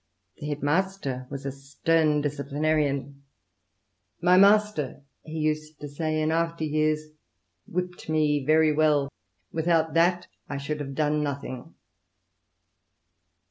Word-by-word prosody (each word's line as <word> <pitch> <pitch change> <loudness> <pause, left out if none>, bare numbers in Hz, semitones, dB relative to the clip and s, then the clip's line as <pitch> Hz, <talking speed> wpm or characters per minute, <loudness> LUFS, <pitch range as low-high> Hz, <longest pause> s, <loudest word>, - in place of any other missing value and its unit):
The 150 - -6
head 145 -1 -4
master 145 -5 -1
was 140 0 -7
a 135 - -2
stern 150 +3 +1
disciplinarian. 145 -1 -1 1.0
My 180 +1 +4
master," 210 -2 +5
INTROD 135 - -6
VCTION. 140 -2 -29
v - - -9
he 160 - -4
used 155 0 -2
to 145 - -6
say 155 +2 -2
in 155 0 +1
after 165 0 0
years, 155 0 +1 0.7
"whipt 180 -1 -4
me 150 -2 +2
very 155 +2 +4
well. 150 -2 +3 0.4
Without 160 -1 +1
that, 175 +2 +3 0.2
I 145 - -3
should 150 +2 -4
have 140 -2 -5
done 150 +1 +1
nothing." 140 -3 -5
155 Hz, 135 wpm, -26 LUFS, 145-160 Hz, 1.0 s, master